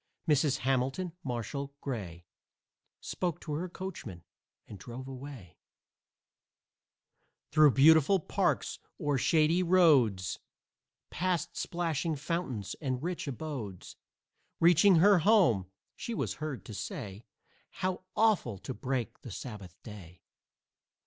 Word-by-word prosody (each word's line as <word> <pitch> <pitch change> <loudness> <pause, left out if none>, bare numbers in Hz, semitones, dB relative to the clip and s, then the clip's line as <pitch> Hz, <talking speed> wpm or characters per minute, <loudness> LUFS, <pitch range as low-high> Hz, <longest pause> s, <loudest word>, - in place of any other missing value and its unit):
Mrs. 145 -2 +3
Hamilton 135 +7 0
Marshall 140 +3 -4
Gray 95 -12 -6 0.8
Spoke 175 -4 -3
to 155 - -5
her 175 +5 -3
coachman 170 - -7 0.4
and 100 - -10
drove 125 +4 -8
away 130 - -10 1.9
Through 150 -2 +6
beautiful 160 +6 +6
parks, - - -1 0.2
o'er 145 -2 0
shady 160 +4 +3
roads, 145 - +3 0.7
Past 175 -3 -1
splashing 165 -2 -2
fountains 145 - -3
and 130 -2 -2
rich 175 -2 -3
abodes. 130 - -6 0.6
Reaching 175 +3 +6
her 195 +3 +6
home, 160 - +4 0.3
she 235 - -5
was - - -2
heard 150 -4 -4
to 110 - -8
say 105 - -6 0.5
"How 185 0 -3
awful 205 - +2
to 100 +8 -6
break 125 -4 -3
the 125 - -9
Sabbath 100 -5 -8
day!" 95 -6 -11
140 Hz, 110 wpm, -31 LUFS, 115-170 Hz, 1.9 s, Through